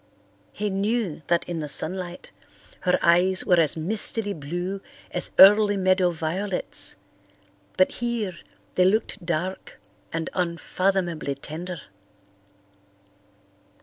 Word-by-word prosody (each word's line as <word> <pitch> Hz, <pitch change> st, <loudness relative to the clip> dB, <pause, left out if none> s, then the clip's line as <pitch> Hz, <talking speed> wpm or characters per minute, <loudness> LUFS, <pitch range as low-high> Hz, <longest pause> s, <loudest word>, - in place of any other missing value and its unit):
He 210 Hz, -1 st, -3 dB
knew 200 Hz, -3 st, -1 dB
that 170 Hz, -1 st, +1 dB
in 170 Hz, -2 st, -4 dB
the 150 Hz, -2 st, -5 dB
sunlight 180 Hz, +4 st, -1 dB, 0.5 s
her 180 Hz, -1 st, +2 dB
eyes 180 Hz, +2 st, +3 dB
were 180 Hz, -2 st, +4 dB
as 160 Hz, -1 st, +3 dB
mistily 205 Hz, +4 st, 0 dB
blue 175 Hz, +6 st, -5 dB, 0.3 s
as 180 Hz, -, -1 dB
early 205 Hz, +1 st, +7 dB
meadow 185 Hz, -1 st, +2 dB
violets, 175 Hz, +4 st, 0 dB, 0.8 s
but 185 Hz, -, +4 dB
here 235 Hz, -6 st, -3 dB, 0.4 s
they 180 Hz, -, +3 dB
looked 210 Hz, 0 st, 0 dB
dark 170 Hz, +2 st, -4 dB, 0.3 s
and 165 Hz, 0 st, -3 dB
unfathomably 175 Hz, -3 st, -1 dB
tender. 160 Hz, +4 st, -7 dB
185 Hz, 105 wpm, -24 LUFS, 170-195 Hz, 0.8 s, early